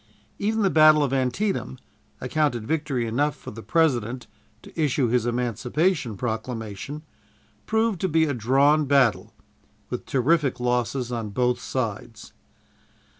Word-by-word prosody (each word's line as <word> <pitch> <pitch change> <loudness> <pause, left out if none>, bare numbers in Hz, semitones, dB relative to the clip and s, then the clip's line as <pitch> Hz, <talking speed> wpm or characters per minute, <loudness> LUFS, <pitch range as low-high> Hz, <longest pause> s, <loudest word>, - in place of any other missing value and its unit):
Even 220 +1 0
the 195 - +2
battle 155 -1 +6
of 135 -2 -1
Antietam, 135 - -1 0.4
accounted 125 -4 -1
victory 145 -4 -1
enough 145 +6 0
for - - -10
the 115 - -9
President 125 -6 0 0.4
to - - -14
issue 135 -4 +1
his 120 0 +1
Emancipation 125 - -1
Proclamation, 115 +4 -5 0.6
proved 220 -4 0
to 190 - 0
be 160 0 +3
a 145 - -1
drawn 140 +6 +3
battle, 135 -5 +2 0.6
with - - -5
terrific 140 +1 +1
losses 125 0 -1
on 115 -3 -3
both 125 +3 0
sides. 115 -3 -5
130 Hz, 125 wpm, -24 LUFS, 120-155 Hz, 0.6 s, battle